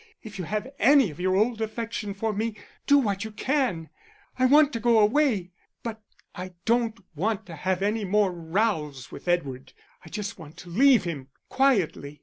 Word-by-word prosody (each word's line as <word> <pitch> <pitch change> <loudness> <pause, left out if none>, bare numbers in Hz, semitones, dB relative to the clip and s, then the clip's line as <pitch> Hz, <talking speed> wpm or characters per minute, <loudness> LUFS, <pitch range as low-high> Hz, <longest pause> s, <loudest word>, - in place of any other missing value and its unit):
If 210 -3 -9
you 180 - -3
have 215 +7 -3
any 275 - +5
of 150 - -13
your 185 +1 +1
old 225 +3 +1
affection 220 -2 -4
for 220 +2 -2
me, 220 +1 -2 0.3
do 285 - +6
what 205 -7 0
you 220 - -5
can. 230 - -1 0.5
I 255 - +5
want 295 +1 +5
to 230 - -2
go 235 0 +3
away; 215 -4 +2 0.3
but 225 -2 -5 0.3
I 185 0 -7
don't 230 -1 +1 0.2
want 205 +6 -1
to 170 - -9
have 185 +4 -1
any 210 +2 0
more 200 0 +2
rows 165 - -2
with - - -11
Edward; 140 -7 -1 0.3
I - - -12
just 210 -1 -5
want 160 +1 -12
to 175 - -11
leave 255 +3 +5
him 150 -7 -5 0.2
quietly. 185 - +1
210 Hz, 180 wpm, -26 LUFS, 175-230 Hz, 0.5 s, do